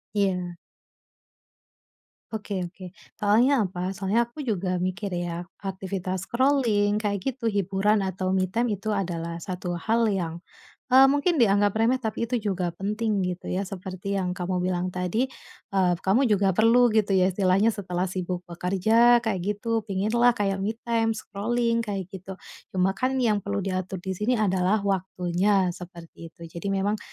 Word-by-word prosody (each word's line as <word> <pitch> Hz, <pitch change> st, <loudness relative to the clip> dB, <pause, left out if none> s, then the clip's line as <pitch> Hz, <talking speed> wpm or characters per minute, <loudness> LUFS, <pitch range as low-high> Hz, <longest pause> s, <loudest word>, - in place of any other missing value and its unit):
Iya. 180 Hz, -3 st, 0 dB, 1.8 s
Oke 205 Hz, -2 st, -3 dB
oke, 180 Hz, +1 st, -10 dB, 0.3 s
soalnya 230 Hz, +5 st, +4 dB
apa? 180 Hz, +1 st, -3 dB
Soalnya 200 Hz, +5 st, +1 dB
aku 240 Hz, +6 st, -9 dB
juga 185 Hz, -7 st, -1 dB
mikir 185 Hz, +1 st, -2 dB
ya 175 Hz, 0 st, -3 dB, 0.2 s
aktivitas 190 Hz, -1 st, -4 dB
scrolling, 235 Hz, -6 st, +2 dB
kayak 205 Hz, -3 st, -1 dB
gitu, 255 Hz, -1 st, -4 dB
hiburan 200 Hz, 0 st, +1 dB
atau 190 Hz, 0 st, -2 dB
me 185 Hz, -1 st, +1 dB
time 230 Hz, +2 st, 0 dB
itu 215 Hz, -, -3 dB
adalah 170 Hz, -5 st, -2 dB
satu 180 Hz, 0 st, -4 dB
hal 225 Hz, +5 st, +1 dB
yang, 170 Hz, -3 st, -2 dB, 0.5 s
eee, 260 Hz, +1 st, +8 dB
mungkin 290 Hz, +5 st, +2 dB
dianggap 205 Hz, -3 st, +3 dB
remeh, 240 Hz, +4 st, +2 dB
tapi 220 Hz, 0 st, -2 dB
itu 245 Hz, +1 st, -1 dB
juga 185 Hz, -4 st, -1 dB
penting, 210 Hz, +2 st, -1 dB
gitu 180 Hz, 0 st, -4 dB
ya, 185 Hz, -, -1 dB
seperti 190 Hz, +1 st, -5 dB
yang 180 Hz, -1 st, -1 dB
kamu 180 Hz, 0 st, -2 dB
bilang 180 Hz, 0 st, -1 dB
tadi, 180 Hz, +7 st, -1 dB, 0.5 s
eee, 185 Hz, -2 st, +3 dB
kamu 220 Hz, +8 st, +3 dB
juga 200 Hz, -1 st, +3 dB
perlu 235 Hz, +4 st, +5 dB
gitu 210 Hz, -2 st, +2 dB
ya 185 Hz, 0 st, +4 dB
istilahnya 195 Hz, +3 st, +3 dB
setelah 180 Hz, -3 st, -2 dB
sibuk 180 Hz, -1 st, -3 dB
bekerja, 220 Hz, +7 st, +3 dB
kayak 220 Hz, -5 st, -1 dB
gitu, 215 Hz, +2 st, -1 dB
pingin 200 Hz, +1 st, -1 dB
lah 240 Hz, 0 st, +5 dB
kayak 195 Hz, -4 st, -1 dB
me 215 Hz, +3 st, -1 dB
time, 225 Hz, -1 st, +1 dB
scrolling, 230 Hz, +3 st, -1 dB
kayak 195 Hz, -3 st, -4 dB
gitu, 190 Hz, 0 st, -8 dB, 0.4 s
cuma 190 Hz, +1 st, +2 dB
kan 260 Hz, +3 st, 0 dB
yang 215 Hz, -3 st, +3 dB
perlu 200 Hz, +1 st, -2 dB
diatur 185 Hz, 0 st, -3 dB
di 190 Hz, +1 st, -3 dB
sini 230 Hz, +4 st, +1 dB
adalah 195 Hz, 0 st, +2 dB
waktunya, 190 Hz, 0 st, +1 dB
seperti 170 Hz, -2 st, -11 dB
itu. -, -, -23 dB, 0.2 s
Jadi 200 Hz, -, -4 dB
memang 200 Hz, +2 st, 0 dB
195 Hz, 155 wpm, -26 LUFS, 185-220 Hz, 1.8 s, eee